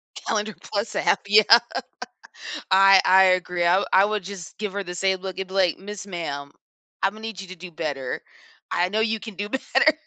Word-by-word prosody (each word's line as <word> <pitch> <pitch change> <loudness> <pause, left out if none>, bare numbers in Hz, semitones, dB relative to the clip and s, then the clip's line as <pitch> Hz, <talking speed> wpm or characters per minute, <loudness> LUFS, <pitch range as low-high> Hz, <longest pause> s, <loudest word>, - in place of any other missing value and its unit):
Calendar 215 -1 -3
Plus 205 +1 -4
app, - - +2
yeah. 215 +3 +7 1.1
I 195 0 +7
I 190 +1 +6
agree. 180 -1 -3
I 175 - +4
wou - - -2
I 190 +1 +6
would 210 -1 -2
just 190 -2 -9
give 210 -2 -4
her 200 0 -3
the 180 -1 -7
same 190 +1 0
look 190 -1 -6
and 190 - -4
be 190 - -12
like, 185 -3 +2
"Miss 200 0 -8
Ma'am, 145 -6 -5 0.5
Imma 200 +3 -2
need 220 -3 -7
you 190 - -10
to 185 - -8
do 180 0 -11
better. 145 -6 -4 0.5
I 175 +1 +1
know 215 +3 -1
you 220 0 0
can 215 0 -9
do 205 +2 -5
better." 270 +5 +2
195 Hz, 205 wpm, -23 LUFS, 180-210 Hz, 1.1 s, yeah